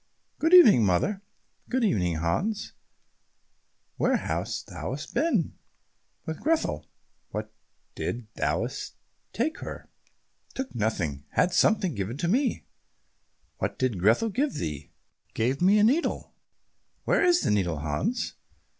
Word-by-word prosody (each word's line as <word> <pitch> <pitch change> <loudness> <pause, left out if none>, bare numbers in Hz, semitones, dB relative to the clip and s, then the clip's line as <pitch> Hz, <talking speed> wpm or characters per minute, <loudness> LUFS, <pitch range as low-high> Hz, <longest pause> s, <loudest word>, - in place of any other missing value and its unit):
"Good 325 +3 +5
evening, 220 - +8
mother." 140 - +1 0.5
"Good 255 -1 0
evening, 90 - +1
Hans. 130 - -1 1.2
Where - - +2
hast - - -3
thou - - -5 0.2
been?" 230 - +1 0.7
"With 160 -1 -5
Grethel." 320 +1 0 0.4
"What - - -5 0.4
didst 120 -1 -4
thou - - 0 0.6
take 295 +8 -1
her?" - - -8 0.6
"Took 265 0 -4
nothing; 85 - -2
had 180 - +2
something 190 -3 +3
given 105 +3 -4
me." 255 +1 +1 0.9
"What - - -2
did 125 -7 0
Grethel 115 - +3
give 275 +8 -1
thee?" 75 -3 -4 0.5
"Gave 130 +6 0
me 195 +4 +5
a 210 - +4
needle." 275 +10 +1 0.7
"Where - - +2
is 355 -1 +4
the - - +1
needle, 90 -6 +1
Hans?" 75 0 -2
160 Hz, 120 wpm, -27 LUFS, -, 1.2 s, evening